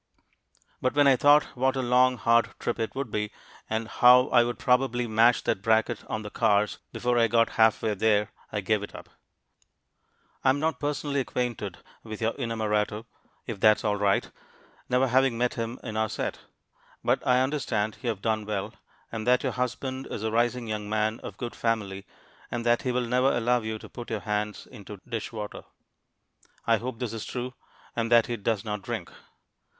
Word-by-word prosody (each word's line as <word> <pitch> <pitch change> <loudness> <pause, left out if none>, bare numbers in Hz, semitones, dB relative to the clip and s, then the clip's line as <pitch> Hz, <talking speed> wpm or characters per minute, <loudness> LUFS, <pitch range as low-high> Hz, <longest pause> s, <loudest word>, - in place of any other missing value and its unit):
But 130 - 0
when 145 0 +5
I 135 -1 +6
thought 145 +3 +6
what 130 +1 +1
a 130 - -1
long, 125 +1 +4
hard 115 -1 +2
trip - - -2
it 110 +2 -3
would 135 -4 -4
be, 105 0 -2 0.4
and 110 0 -2
how 125 +2 +6
I 120 -1 +5
would 120 0 -3
probably 125 -1 +2
mash 115 +2 +4
that - - 0
bracket 110 +1 +1
on 110 - -3
the 105 - -7
cars 105 -3 +2
before 120 0 0
I 115 - +4
got 115 0 +3
half 110 0 +3
way 110 -2 +1
there, 105 +1 +2 0.2
I 105 - -2
gave 105 +1 +1
it 100 - -8
up. - - -10 1.3
I 130 - +4
am 135 +2 +2
not 155 -3 -1
personally 145 -1 -1
acquainted 120 -7 -3 0.3
with 110 -2 -7
your 115 0 0
inamorato, 110 -3 -1 0.4
if 115 -5 -5
that's 110 +1 +5
all 105 -2 +1
right, 100 -1 +1 0.6
never 125 +1 +3
having 130 -1 +3
met 125 +1 +1
him 115 +1 -4
in 110 - -6
our 110 0 0
set; - - -3 0.6
but - - +2
I 125 0 +3
understand 120 -6 -1
you 125 - -1
have 100 -4 -4
done 110 -1 0
well, 100 -3 -3 0.4
and 110 0 -5
that 125 0 +4
your - - 0
husband 130 +1 -3
is 105 - -5
a 110 - -1
rising 120 +1 +1
young 105 -1 -4
man 110 +1 0
of - - -9
good 120 -1 -5
family, 100 -4 -2 0.4
and 120 -1 -4
that 120 0 +3
he 125 - -1
will 125 0 0
never 125 +3 +2
allow 120 +1 +1
you 110 0 -4
to - - -11
put 120 - -9
your 110 -2 -3
hands 105 0 -3
into 100 -1 -11
dishwater. 110 -2 -5 1.0
I 115 -1 +4
hope 120 +2 -5
this 120 -2 -4
is 115 - -5
true 125 0 -5 0.4
and 115 0 -1
that 115 -1 +6
he 120 - -3
does 110 0 -1
not 105 -1 -3
drink. 110 -5 -5
115 Hz, 190 wpm, -27 LUFS, 110-125 Hz, 1.3 s, I